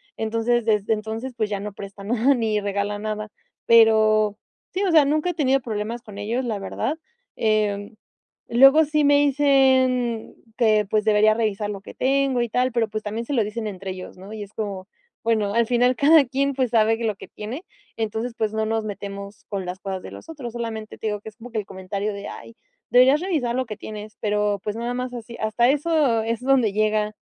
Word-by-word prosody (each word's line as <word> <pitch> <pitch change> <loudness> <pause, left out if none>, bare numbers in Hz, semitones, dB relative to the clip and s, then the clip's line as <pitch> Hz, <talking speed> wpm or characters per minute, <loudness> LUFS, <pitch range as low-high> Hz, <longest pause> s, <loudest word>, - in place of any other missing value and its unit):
Entonces, 230 +2 0
desde 215 -1 +1
entonces, 220 +4 -4
pues 215 -3 -1
ya 205 -1 -2
no 205 0 -6
prestan 200 0 -9
nada 245 +4 +3
ni 220 -4 0
regala 200 0 -2
nada. 215 0 -4 0.4
Pero 215 -2 +5 0.4
sí, 380 - -1
o 370 - +1
sea, 315 -3 +7
nunca 305 +5 +1
he - - -8
tenido 270 -5 +2
problemas 230 -1 -4
con 210 -4 -12
ellos, 230 +5 -2
la 220 -4 -2
verdad. 225 +8 -3 0.4
Em, 210 -1 0 0.6
luego 270 +6 +7
sí 305 0 +1
me 285 0 +5
dicen 260 -4 +2 0.2
que, 215 -3 +3
pues, 215 0 +1
debería 215 0 +5
revisar 215 -2 -1
lo 200 -2 -5
que - - -11
tengo 270 -1 +1
y 240 - -1
tal, 250 +3 +1
pero, 235 -2 +1
pues, 215 +1 -4
también 215 +2 -3
se 285 - -4
lo 235 -5 +3
dicen 215 +2 -4
entre 190 -1 -5
ellos, 185 0 -9
¿no? 195 +3 -10
Y 215 - -6
es 205 +1 -13
como, 200 -3 -5 0.4
bueno, 215 -3 +1
al 230 0 +2
final 245 +1 +3
cada 290 +4 +6
quien 275 +2 0
pues 255 -3 -1
sabe 225 -1 +3
que 235 - -5
lo 215 -2 0
que - - -11
tiene, 235 - -7 0.3
entonces 225 +2 -3
pues 220 -1 0
no 220 0 0
nos 220 0 -1
metemos 200 0 -7
con 195 -3 -3
las 180 +1 -5
cosas 190 -1 -5
de - - -9
los - - -12
otros, 275 -8 -7
solamente 225 -2 -5
te - - -4
digo 210 -1 -2
que 220 - -8
es 215 - -21
como 240 +1 -12
que 225 - -4
el 205 - -5
comentario 195 +2 -4
de: 200 0 -7
"Ay, 230 - -10 0.3
deberías 260 +5 +5
revisar 310 -11 -1
lo 260 0 0
que 215 - -6
tienes". 215 0 -9
Pero, 210 -1 0
pues, 210 0 -3
nada 235 +2 -3
más 250 0 -4
así, 235 -1 -8
hasta 220 +3 +2
eso 290 -5 +2
es 230 +1 -2
donde 255 -5 +3
llega, 215 0 +1
220 Hz, 215 wpm, -23 LUFS, 210-250 Hz, 0.6 s, sea